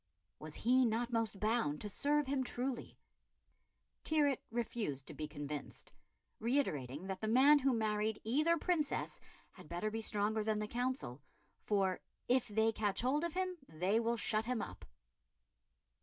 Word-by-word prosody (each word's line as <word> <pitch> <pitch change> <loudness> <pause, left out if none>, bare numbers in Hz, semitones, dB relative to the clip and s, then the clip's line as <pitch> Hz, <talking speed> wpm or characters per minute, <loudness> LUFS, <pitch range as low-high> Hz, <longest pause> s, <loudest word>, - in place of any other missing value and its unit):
Was 155 0 -8
he 255 +3 +4
not 235 +1 0
most 225 -3 0
bound 215 -9 +1
to - - -2
serve 290 +8 +1
him 265 0 0
truly? 250 0 -3 1.1
Tyrwhitt 290 -4 +3
refused 220 - -2
to - - -7
be 155 - -4
convinced, 145 -1 -7 0.5
reiterating 175 - -1
that 190 -1 -4
the 220 - -1
man 270 +6 +7
who 270 0 +2
married 215 -2 0
either 305 +9 +3
Princess 315 -3 -1 0.3
had 180 -6 -14
better 175 +5 -2
be 225 +1 -3
stronger 215 0 +1
than 215 0 +1
the 210 0 -2
Council, 245 - -2 0.5
for 195 -3 +2 0.3
"if 250 0 +3
they 220 +1 +2
catch 210 -2 0
hold 275 +6 +1
of 340 -2 -2
him, 370 -1 -1
they 185 +7 +1
will 235 +1 0
shut 215 0 0
him 250 -1 -1
up." - - -6
225 Hz, 155 wpm, -36 LUFS, 205-260 Hz, 1.1 s, man